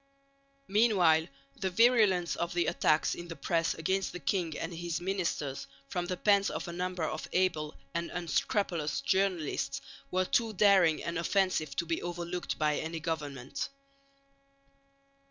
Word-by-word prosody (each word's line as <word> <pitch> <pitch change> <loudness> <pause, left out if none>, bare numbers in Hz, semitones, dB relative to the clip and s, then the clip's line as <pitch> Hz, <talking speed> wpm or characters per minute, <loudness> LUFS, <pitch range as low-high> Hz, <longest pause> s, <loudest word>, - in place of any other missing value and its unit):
Meanwhile 190 -7 +4 0.3
the 190 - -2
virulence 210 -5 +4
of 170 0 -3
the 175 - +2
attacks 155 0 +2
in 175 - -7
the 165 - -7
press 165 -1 0
against 190 +4 -1
the 180 - -5
king 165 +2 -1
and - - -4
his 170 0 -3
ministers 175 -7 -2 0.2
from 175 -1 -2
the 180 -1 -2
pens 200 0 +3
of - - -4
a 170 - -5
number 180 -1 -2
of 155 0 -3
able 165 -5 +1 0.2
and 170 0 -2
unscrupulous 170 -4 -1
journalists 170 -6 0 0.3
were 185 +3 +1
too 225 +3 +1
daring 190 -5 +4
and 170 -1 -2
offensive 185 -3 +1
to 170 - -1
be 165 0 -1
overlooked 175 0 -4
by 150 -1 +1
any 160 +1 -4
government. 145 -5 -4
175 Hz, 145 wpm, -31 LUFS, 160-190 Hz, 0.3 s, Meanwhile